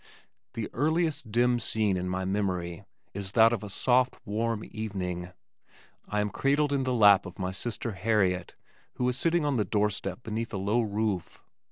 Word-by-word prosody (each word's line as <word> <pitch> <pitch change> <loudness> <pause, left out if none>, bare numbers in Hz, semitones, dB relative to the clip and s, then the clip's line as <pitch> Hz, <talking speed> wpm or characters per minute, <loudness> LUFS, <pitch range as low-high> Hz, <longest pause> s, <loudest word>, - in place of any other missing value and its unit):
The 115 -2 -3
earliest 155 -3 0
dim 120 +2 +3
scene 110 -4 +1
in 90 0 -2
my 95 +1 -2
memory 95 -2 -2 0.3
is 100 0 -6
that 115 0 +6
of 115 - -2
a 105 - -7
soft 125 +5 +2
warm 110 +1 -1
evening. 90 -5 -4 0.8
I 105 0 0
am 105 0 -2
cradled 145 +1 +1
in 135 -2 0
the 130 - 0
lap 100 -4 +6
of 90 - -11
my 95 -1 -2
sister 115 +4 -4
Harriet 95 -2 0 0.4
who 125 - 0
is 125 - -1
sitting 165 +3 +1
on 145 -3 +1
the 105 - +2
door 105 +2 +1
step 95 +3 -5
beneath 115 +1 -4
a - - -1
low 105 +5 +1
roof. 105 -4 -2
105 Hz, 180 wpm, -28 LUFS, 95-120 Hz, 0.8 s, that